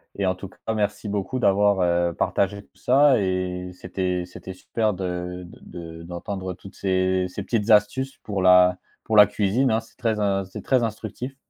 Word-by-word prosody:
et 100 - -1
en 95 - +2
tout 95 0 -9
cas - - -22 0.2
merci 105 0 -2
beaucoup 105 +5 -2
d'avoir, 100 -2 +3
heu, 85 -1 +2
partagé 100 +4 -1
tout - - -30
ça 135 -1 +4
et 90 -1 -2
c'était 90 0 -3
c'était 95 +1 -10
super 105 +3 -1
de 90 -1 -4
de 85 -1 -10
de - - -10
d'entendre 95 +2 -5
toutes 95 +2 -14
ces 95 -1 +1
ces - - -6
petites 115 -2 -1
astuces 110 +6 +3
pour 100 -3 -3
la 90 0 +6 0.3
pour 110 - -1
la 105 -1 +10
cuisine, 110 +6 +1
hein, 110 - +2
c'est 115 - -16
très 115 -4 -1
in 100 -2 0
c'est 95 - -9
très 130 -3 +2
instructif. 125 +4 -5
95 Hz, 190 wpm, -24 LUFS, 90-105 Hz, 0.3 s, la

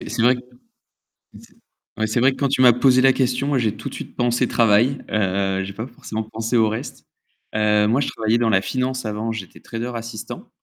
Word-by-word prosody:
et - - -8
c'est 115 0 -1
vrai 125 +2 +5
que 125 - -9 0.7
et - - -19
c'est - - -19 0.5
ouais, 110 - +1
c'est 110 +3 0
vrai 130 +2 +4
que - - -8
quand 140 - +1
tu 130 - +1
m'as 125 -2 +7
posé 130 +1 +4
la 135 0 +5
question, 130 +1 0
moi 140 -3 +1
j'ai 110 -3 0
tout - - -6
de - - -12
suite - - -8
pensé 120 0 +1
travail, 115 +4 +3
heu, 95 -1 0
j'ai 100 0 -7
pas 110 +4 -5
forcément 110 -3 -6
pensé 115 +2 -2
au 110 -1 +4
reste, 110 - -6 0.5
heu, 105 -1 +3
moi, 125 +6 +2
je - - -1
travaillais 110 +1 0
dans 115 -1 +2
la 95 -3 +3
finance 130 +4 -2
avant, 110 +1 -3
j'étais 95 -6 -8
trader 115 +2 -5
assistant. 115 -2 -7
115 Hz, 230 wpm, -21 LUFS, 110-125 Hz, 0.7 s, m'as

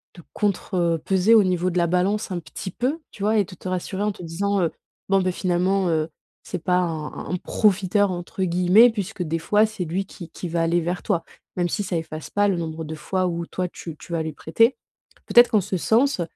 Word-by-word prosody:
de 175 - -13
contrepeser 190 0 +1
au 215 - +7
niveau 180 -1 +1
de 180 - -3
la 170 - +3
balance 190 +4 0
un 180 - -2
petit 170 +3 -7
peu, 265 - -1
tu - - -13
vois, 215 +2 +2
et 205 - +4
de 185 - -12
te 185 - -9
rassurer 185 +1 -3
en 210 0 +1
te 180 - -10
disant, 195 +4 -1
heu: 165 - +1 0.4
«Bon, 195 0 +4
ben, 185 0 +1
finalement, 185 +1 +1
heu, 160 -1 0 0.3
c'est 180 - -5
pas 180 0 +2
un 165 -4 -2
un - - -7
un 180 - +1
"profiteur"», 200 +1 +2
entre 175 +2 -6
guillemets, 180 +6 +5
puisque 205 -3 -4
des 165 0 -1
fois, 210 +6 +3
c'est 195 -5 -5
lui 185 +5 -2
qui 175 -4 -10
qui 175 - -6
va 170 0 0
aller 170 +1 +2
vers 175 +2 -3
toi. 170 -6 0 0.3
Même 175 -1 0
si 205 - -1
ça 180 -3 -2
efface 155 -1 -6
pas 205 0 +2
le 190 - +1
nombre 160 -1 -4
de 160 0 -6
fois, 185 +4 -1
où, 170 -1 -3
toi 180 +1 -3
tu 165 -2 -9
tu 175 - -13
vas 165 -1 0
lui 160 - -4
prêter. 230 - +2 0.5
Peut-être 240 0 +7
qu'en 215 -4 +4
ce 190 0 -2
sens, 230 - +2
180 Hz, 230 wpm, -23 LUFS, 170-200 Hz, 0.5 s, au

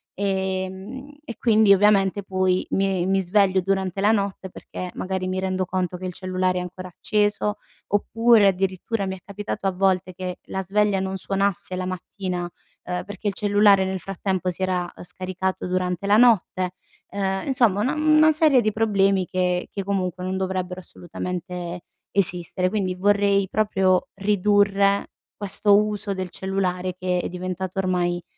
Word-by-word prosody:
ehm, 190 +6 -3
e 235 - -7
quindi 220 -3 +5
ovviamente 200 0 +3
poi 185 -1 0
mi 195 -2 +1
mi 195 0 +2
sveglio 190 0 +3
durante 190 0 -1
la 205 +2 +4
notte 200 -3 -2
perché 180 0 -7
magari 185 0 -3
mi 185 0 -2
rendo 185 0 -1
conto 180 -1 -2
che 185 - -7
il 180 - -4
cellulare 185 0 -1
è - - -3
ancora 185 +1 -7
acceso, 210 +3 0 0.3
oppure 225 +2 +4
addirittura 195 +2 -1
mi 190 - -3
è - - -13
capitato 200 0 -5
a 195 - +3
volte 185 0 +1
che 180 0 -5
la 190 - -2
sveglia 205 +1 +1
non 190 0 -3
suonasse 195 -1 -1
la 185 0 -3
mattina, 185 0 -4
uhm, 180 +1 -7
perché 205 +1 -4
il - - -4
cellulare 205 -1 +4
nel 190 0 -3
frattempo 190 0 -2
si 180 - -10
era, 185 -1 +1
uhm, - - -10
scaricato 185 +1 -4
durante 180 0 -1
la 205 +1 +4
notte. 195 -6 +3 0.4
Ehm, 195 +1 -2
insomma 235 -7 +3
una 265 +7 0
mhmm, 305 0 +4
una 315 0 +6
serie 305 -4 +4
di 215 -1 +1
problemi 195 -3 +2
che 180 0 -1
che 200 - -4
comunque 185 -2 -2
non 185 +1 -2
dovrebbero 185 -1 -3
assolutamente 175 0 -6 0.3
esistere. 180 -1 0
Quindi 190 -2 -1
vorrei 200 0 +2
proprio 190 -3 +1
ridurre 200 0 +2 0.3
questo 205 0 +2
uso 210 -1 -3
del 185 -1 -4
cellulare 185 0 -2
che 180 -1 -1
è - - -2
diventato 185 +1 -4
ormai 175 -2 0
190 Hz, 160 wpm, -23 LUFS, 185-205 Hz, 0.4 s, una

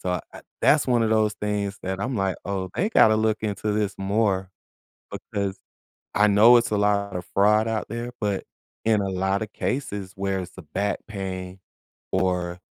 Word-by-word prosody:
so, 90 -1 -1
eh, - - -9 0.2
that's 150 -2 +4
one 120 -2 +3
of 110 - +1
those 110 -1 +2
things 105 -1 -2
that 95 0 -3
I'm 125 +5 -2
like, 95 -2 0
"Oh, 95 -2 -3
they 205 +6 +1
gotta 110 - +6
look 110 0 +1
into 105 0 -1
this 105 -2 0
more," 95 -1 0 0.6
because 100 -1 -4 0.6
I 105 +1 +5
know 110 +4 +7
it's 115 - 0
a 105 - +2
lot 100 -1 +1
of 90 -1 -4
fraud 105 +2 +4
out 110 -1 -2
there, 120 +2 -4
but 100 -2 -1 0.4
in 110 -2 +3
a 100 - -1
lot 95 +2 0
of 105 - -9
cases 100 -8 -3
where 95 0 -1
it's 90 -1 -6
the 95 - -10
back 100 +7 -2
pain 95 -2 -5 0.5
or 90 -2 0
100 Hz, 185 wpm, -24 LUFS, 95-110 Hz, 0.6 s, know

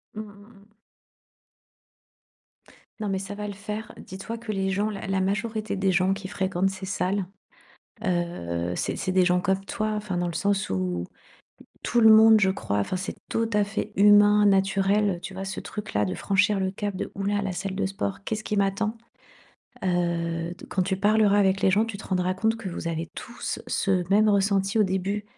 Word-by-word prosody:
Mmh, 215 - -4
mmh, 205 +1 -15
mmh. 210 +1 -25 2.3
Non, 210 - -3
mais 190 -1 -1
ça 195 +1 -6
va 210 0 -5
le 205 - -5
faire. 210 +2 -6
Dis 190 - -9
toi 230 +4 -6
que 230 -2 -5
les 195 -1 -1
gens 205 +3 0
la 200 -2 -6
la 190 -1 0
majorité 215 +2 -2
des 190 0 +2
gens 185 +2 +2
qui 195 -1 -6
fréquentent 190 -1 0
ces 190 0 -7
salles, 185 +1 -1 0.8
heu, 90 - -2
c'est - - -1
c'est 185 - -2
des 185 -1 +4
gens 180 0 +3
comme 190 +1 0
toi, 215 +1 -2
enfin 205 -4 -3
dans 175 0 0
le 170 - -5
sens 200 - 0
où, 90 -2 -1 0.8
tout 240 - +1
le 220 -1 +8
monde, 220 0 +7
je 190 -1 +4
crois, 100 - -2
enfin, 145 - -1
c'est 185 - -5
tout 225 0 0
à 210 0 +3
fait 205 +1 -4
humain, 205 +1 +6
naturel, 195 0 +2
tu 190 - -7
vois, 190 +1 -5
ce 190 0 -5
truc 210 - -7
là 105 0 +2
de 90 -1 -3
franchir 200 - +2
le 190 0 0
cap 205 0 -4
de - - -4
«Ouh 195 - -4
là, 205 0 0
la 195 -2 -2
salle 195 +1 -4
de 200 -1 0
sport. 195 0 -4
Qu'est 220 - -2
ce 215 - -6
qui 210 - -2
m'attend?» 200 +3 0 0.9
Heu, 170 -1 -1
d - - -12
quand 185 - 0
tu 190 +1 -1
parleras 205 0 +3
avec 195 -1 +3
les 190 - +5
gens, 210 +4 +3
tu 225 -3 -6
te 210 - -10
rendras 185 -1 0
compte 220 +3 +1
que 215 -4 -6
vous 170 -1 -4
avez 165 0 -3
tous 240 - -5
ce 185 -3 0
même 215 +2 +5
ressenti 200 +1 +2
au - - +6
début. 195 +2 -2
195 Hz, 210 wpm, -26 LUFS, 185-210 Hz, 2.3 s, le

